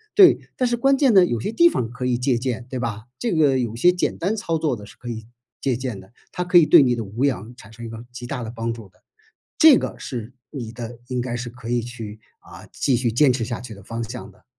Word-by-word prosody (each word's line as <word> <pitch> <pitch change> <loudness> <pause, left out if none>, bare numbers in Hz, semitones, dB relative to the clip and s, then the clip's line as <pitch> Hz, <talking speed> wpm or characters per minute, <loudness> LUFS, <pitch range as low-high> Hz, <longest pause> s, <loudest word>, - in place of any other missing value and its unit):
对。 380 -4 +8 0.2
但 255 - 0
是 240 0 0
关 270 +3 +3
键 270 -4 +4
呢， 190 -3 +7
有 120 -9 -2
些 205 - -2
地 340 +10 +6
方 120 - -1
可 125 +1 -5
以 125 -1 +1
借 125 0 +1
鉴 125 -1 -3
对 130 - -4
吧， 110 -3 -3 0.2
这 235 -5 -1
个 145 -5 +3
有 115 -3 -2
些 175 +10 +5
简 180 - -1
单 195 +6 -1
操 165 -7 -1
作 155 -3 0
的 105 - -10
是 - - -15
可 120 - -8
以 110 -2 -6 0.3
借 130 -3 0
鉴 125 -5 -4
的， 95 +5 -16 0.2
它 180 - -3
可 180 0 +5
以 170 - +7
对 - - +8
你 125 -2 +2
的 115 - -3
无 110 +7 -2
氧 115 -4 -2
产 110 -3 -14
生 115 +1 -9
一 - - -6
个 115 +1 -9
极 120 0 -7
大 125 0 -4
的 110 - -5
帮 115 0 -2
助 115 -3 -8
的， - - -31 0.6
这 310 -5 +8
个 - - -4
是 120 -1 -6 0.2
你 120 -6 -6
的 115 0 -8
应 125 -2 -1
该 120 -1 -4
是 120 0 -4
可 120 -1 -9
以 120 0 +2
去， 115 -3 -8 0.2
啊， - - -13
继 135 - +1
续 120 0 +1
坚 130 +4 +4
持 125 -1 -2
下 115 +1 -3
去 125 - -9
的 100 - -14
方 115 +4 -5
向 120 +3 -8
的。 - - -24
120 Hz, 290 characters per minute, -22 LUFS, 115-145 Hz, 0.6 s, 对